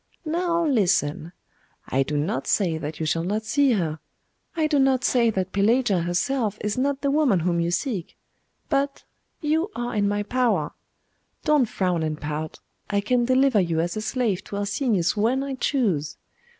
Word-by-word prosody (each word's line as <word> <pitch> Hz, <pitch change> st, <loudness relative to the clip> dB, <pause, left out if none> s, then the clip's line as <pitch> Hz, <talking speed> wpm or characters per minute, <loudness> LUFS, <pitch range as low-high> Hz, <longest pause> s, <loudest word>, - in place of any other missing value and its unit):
Now 340 Hz, +1 st, 0 dB
listen. 180 Hz, -, +1 dB, 0.6 s
I 135 Hz, -, +1 dB
do 145 Hz, +2 st, -1 dB
not 145 Hz, -2 st, -2 dB
say 170 Hz, -6 st, +1 dB
that 150 Hz, 0 st, -6 dB
you 160 Hz, -, -1 dB
shall 165 Hz, +2 st, 0 dB
not 210 Hz, +5 st, -1 dB
see 275 Hz, +3 st, +3 dB
her 160 Hz, -6 st, -1 dB, 0.6 s
I 315 Hz, -, +2 dB
do 300 Hz, -2 st, +2 dB
not 265 Hz, -1 st, +3 dB
say 235 Hz, -2 st, +3 dB
that 190 Hz, -3 st, -2 dB
Pelagia 210 Hz, 0 st, +2 dB
herself 205 Hz, +6 st, -1 dB
is 210 Hz, 0 st, -1 dB
not 275 Hz, +1 st, 0 dB
the 280 Hz, -1 st, +1 dB
woman 280 Hz, -, +3 dB
whom 170 Hz, 0 st, 0 dB
you 170 Hz, 0 st, 0 dB
seek 190 Hz, -, -3 dB, 0.5 s
but 280 Hz, -1 st, -1 dB, 0.4 s
you 320 Hz, +5 st, +1 dB
are 240 Hz, 0 st, -3 dB
in 205 Hz, -1 st, +1 dB
my 205 Hz, 0 st, 0 dB
power. 245 Hz, +2 st, 0 dB, 0.7 s
Don't 295 Hz, -7 st, +3 dB
frown 180 Hz, -3 st, 0 dB
and 155 Hz, -1 st, -2 dB
pout. 150 Hz, +1 st, -5 dB, 0.3 s
I 205 Hz, -, +1 dB
can 240 Hz, +4 st, +1 dB
deliver 260 Hz, -2 st, +3 dB
you 170 Hz, -3 st, 0 dB
as 175 Hz, +3 st, -1 dB
a 215 Hz, -, -3 dB
slave 215 Hz, -4 st, -1 dB
to -, -, -7 dB
Arsenius 205 Hz, -2 st, 0 dB
when 235 Hz, +6 st, +1 dB
I 275 Hz, -1 st, -4 dB
choose. 210 Hz, -, 0 dB
215 Hz, 175 wpm, -24 LUFS, 175-265 Hz, 0.7 s, see